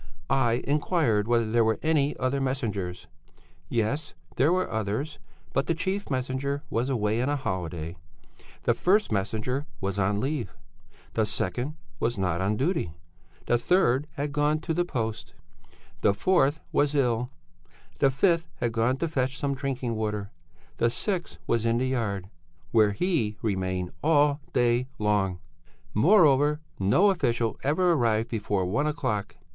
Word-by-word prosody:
I 120 -3 +2
inquired 145 - +1
whether 115 -2 +2
there 115 0 +4
were 110 -1 +2
any 150 -2 +2
other 130 +2 0
messengers. 105 -10 -2 0.6
Yes, 120 +6 -1 0.2
there 140 +6 +3
were 185 +1 +1
others. 110 +8 -3 0.3
But 135 - +1
the 165 - +1
chief 190 +4 -2
messenger 130 +2 -2
was 120 +4 0
away 110 -3 +1
on 130 - 0
a 145 - +1
holiday; 90 - -3 0.7
the - - +3
first 205 - +2
messenger 110 +8 -1
was 100 0 -2
on 100 +1 +1
leave; 135 0 -3 0.6
the 110 -1 +1
second 120 +8 -2 0.2
was 120 -1 0
not 90 -2 0
on 100 +3 +1
duty; 140 - 0 0.5
the 120 - +2
third 145 -3 +2
had 145 -2 -3
gone 150 +1 +2
to 165 - -2
the 175 +2 +1
post; 110 -8 -4 0.7
the 100 - +3
fourth 155 - +2
was 145 0 +2
ill; 125 -3 +1 0.7
the 135 - +5
fifth 165 +5 +2
had 120 -1 -1
gone 115 +3 +1
to 165 - -1
fetch 135 -3 -1
some 140 -1 -1
drinking 130 -3 -2
water; 105 -2 -3 0.5
the 115 - +3
sixth 180 - -3
was 115 -1 +1
in 115 0 +2
the 130 - +1
yard 100 -7 -2 0.4
'where 105 -3 +4
he 120 - 0
remained 95 -4 -1
all 145 -1 +3
day 120 0 +2
long'; 105 -3 +1 0.6
moreover, 150 - +5 0.2
no 140 - +4
official 120 - 0
ever 175 +5 +3
arrived 115 -5 +1
before 100 -4 -1
one 110 +12 0
o'clock. 105 - -2
125 Hz, 150 wpm, -27 LUFS, 105-145 Hz, 0.7 s, the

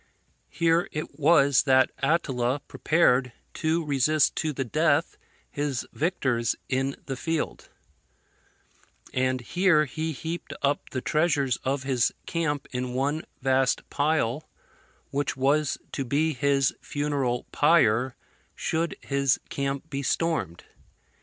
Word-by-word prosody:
Here 170 0 +1
it 155 -1 -6
was 140 -3 +5
that 130 -2 +4
Attila 135 -5 0
prepared 130 -6 +2 0.2
to 160 0 0
resist 145 +2 +2
to 155 - 0
the 135 -2 -2
death 155 +4 +1 0.4
his 145 -4 -2
victors 130 -8 0
in 135 +1 -1
the 135 - -3
field; 160 +4 -3 1.4
and 130 0 0
here 170 +3 +3
he 160 +4 -3
heaped 160 0 -5
up 145 +1 0
the 130 - -3
treasures 145 -6 +1
of 135 0 -2
his 130 -3 +1
camp 145 -4 -2
in 125 0 -3
one 145 +5 -1 0.2
vast 130 -1 +2
pile, 145 -2 0 0.6
which 140 -1 -1
was 140 +2 +2
to 135 - -2
be 150 +5 +1
his 140 -1 +2
funeral 140 -4 -1
pyre 130 -5 +3 0.4
should 165 +1 -1
his 140 -2 +1
camp 140 +2 -3
be 140 -1 -2
stormed. 140 - -1
140 Hz, 120 wpm, -26 LUFS, 130-155 Hz, 1.4 s, was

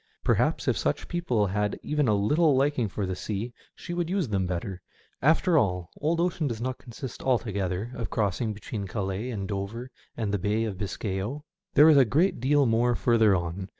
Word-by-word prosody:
Perhaps - - +1
if - - +3
such - - -1
people 145 -12 0
had 105 +1 -1
even 150 -3 0
a 105 - +3
little 150 +9 +3
liking 135 -3 +2
for 100 +1 -3
the 95 0 -3
sea 110 +5 -4 0.2
she 175 - -7
would 175 -1 -1
use 185 - 0
them 95 -3 0
better. 90 +1 -4 0.4
After 160 +3 +4
all, 90 -6 -1
old 165 +3 0
ocean 170 -3 0
does 115 -4 -3
not 125 +1 -3
consist 125 +1 -8
altogether 105 -4 -1
of 115 -5 -4
crossing 110 +1 0
between 100 0 -6
Calais 95 +3 -3
and 100 -5 -4
Dover 110 +5 -5 0.3
and 110 -3 -2
the 105 - +1
Bay 105 +4 0
of 100 -4 -4
Biscay 100 -1 -3
0. 135 +10 -4 0.3
There 150 - +8
is 155 -2 +7
a 135 - +8
great 160 - +2
deal 140 +3 +3
more 120 +1 +2
further 110 -5 +4
on. 90 +2 -3
115 Hz, 195 wpm, -27 LUFS, 100-140 Hz, 0.4 s, There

